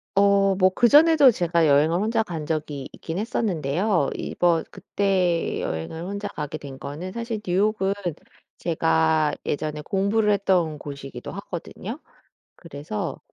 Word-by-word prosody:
어 200 0 +5 0.2
뭐 185 0 +6
그전에도 290 +3 +6
제가 170 -5 +1
여행을 150 +4 +4
혼자 225 +3 +1
간 165 -5 -5
적이 150 -3 -3
있긴 165 +1 -6
했었는데요. 185 -5 0
이번 170 -2 0
그때 185 -4 0
여행을 80 - -4
혼자 200 +3 -4
가게 150 -5 -5
된 140 -3 -9
거는 155 +7 -6
사실 230 -1 -4
뉴욕은 195 +2 +1 0.6
제가 80 -1 +2
예전에 150 +1 -2
공부를 200 +6 +1
했던 180 -6 +1
곳이기도 140 -3 -8
하거든요. 200 - -7 0.6
그래서 145 -8 -6
175 Hz, 285 characters per minute, -24 LUFS, 150-200 Hz, 0.6 s, 뭐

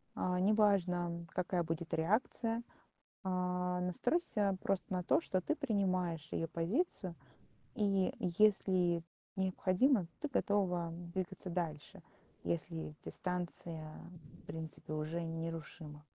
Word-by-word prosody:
Э, 180 0 +1
неважно, 180 -4 +3
какая 180 -1 0
будет 165 0 -3
реакция. 225 +6 +1 0.6
Э, 180 -1 0
настройся 205 - +1
просто 195 -1 0
на 180 - +1
то, 245 - +4
что 185 - 0
ты 305 - 0
принимаешь 185 - 0
её 165 - 0
позицию. 185 - 0 0.6
И 200 -4 +2 0.3
если 185 -5 +4 0.3
необходимо, 190 +3 +3
ты 305 - -1
готова 190 - +1 0.2
двигаться 185 0 -3
дальше, 170 +2 -3 0.4
если 165 -2 -2
дистанция, 170 -3 -4 0.5
в - - -23
принципе, 160 0 -6
уже 155 +3 -1
нерушима. 165 -2 -5
180 Hz, 105 wpm, -36 LUFS, 165-195 Hz, 0.6 s, то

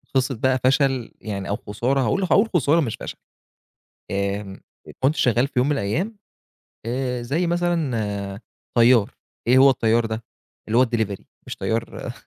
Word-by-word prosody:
قصّة 130 0 +1
بقى 130 +3 +1
فشل 130 -2 +2
يعني 100 -3 -5
أو 100 - 0
خسارة 120 +7 -1
هاقول 130 - +1
هاقول 205 +4 +3
خسارة 160 +1 +4
مش 115 -7 -2
فشل. - - -7 0.9
آمم، 100 0 -3 0.4
كنت 135 +4 +2
شغّال 125 -1 +2
في - - -26
يوم 125 - +2
من - - +2
الأيام 160 - -2 0.7
آآ، 125 0 -2
زي 150 +9 0
مثلًا 120 - -1 0.4
طيار 120 -2 +5 0.4
إيه 125 +2 +5
هو 135 +1 +8
الطيار 115 -2 +2
ده 110 0 -5 0.4
اللي 115 +3 +2
هو - - +7
الديليفري 110 -5 -2 0.2
مش - - -6
طيار 115 +1 -3
125 Hz, 150 wpm, -23 LUFS, 110-135 Hz, 0.9 s, هو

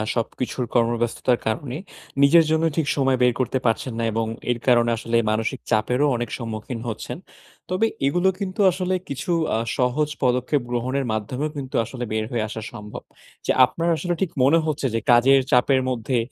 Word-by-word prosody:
সবকিছুর 125 +2 -2
কর্মব্যস্ততার 120 +1 +1
কারণে 125 +4 -2 0.4
নিজের 160 +4 +7
জন্য 160 0 +2
ঠিক 155 -3 +1
সময় 135 -2 +2
বের 125 - +4
করতে 130 +1 0
পারছেন 115 +2 0
না - - -1
এবং 115 +1 -1 0.3
এর 120 - -2
কারণে 120 -1 +4
আসলে 115 +1 0
মানসিক 115 +4 -1
চাপেরও 125 +6 +2
অনেক 120 -1 -3
সম্মুখীন 115 0 -5
হচ্ছেন। 110 - -5 0.5
তবে 185 +5 +2 0.2
এগুলো 175 +6 +2
কিন্তু 190 -1 -5
আসলে 185 +1 -1
কিছু 140 +6 -3 0.5
সহজ 130 +4 +1
আ - - -39
পদক্ষেপ 125 +3 +1
গ্রহণের 130 +3 -1
মাধ্যমেও 125 +8 -2
কিন্তু 135 -2 -6
আসলে 125 +1 -6
বের 110 0 -1
হয়ে 115 -3 0
আসা 110 - -6
সম্ভব। 105 -2 -8 0.4
যে, - - +2
আপনার 165 +6 -2
আসলে 175 +1 -2
ঠিক 190 - 0
মনে 155 +5 +5
হচ্ছে 150 -3 -2
যে, 115 - +1
কাজের 130 +3 +6
চাপের 130 +2 +4
মধ্যে 125 0 -1
125 Hz, 170 wpm, -23 LUFS, 115-145 Hz, 0.5 s, নিজের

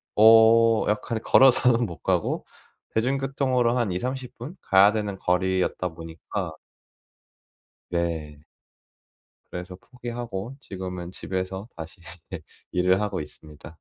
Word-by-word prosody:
어 115 +1 +6
약간 110 +2 -1
걸어서는 125 -2 +5
못 85 -4 -7
가고 - - 0 0.5
대중교통으로 130 0 +1
한 115 -6 0
2-30 125 +7 -4
분 135 +10 -8
가야 100 +2 +5
되는 105 -3 -3
거리였다 90 0 0
보니까 80 +2 -6 1.4
네. 80 -4 -3 1.1
그래서 90 +1 -7
포기하고 120 0 -7
지금은 90 -4 -6
집에서 95 +3 -5
다시 80 +3 -9 0.3
예 90 - -5 0.3
일을 90 +1 +2
하고 105 -5 -2
있습니다. 75 +1 -11
100 Hz, 235 characters per minute, -25 LUFS, 90-120 Hz, 1.4 s, 어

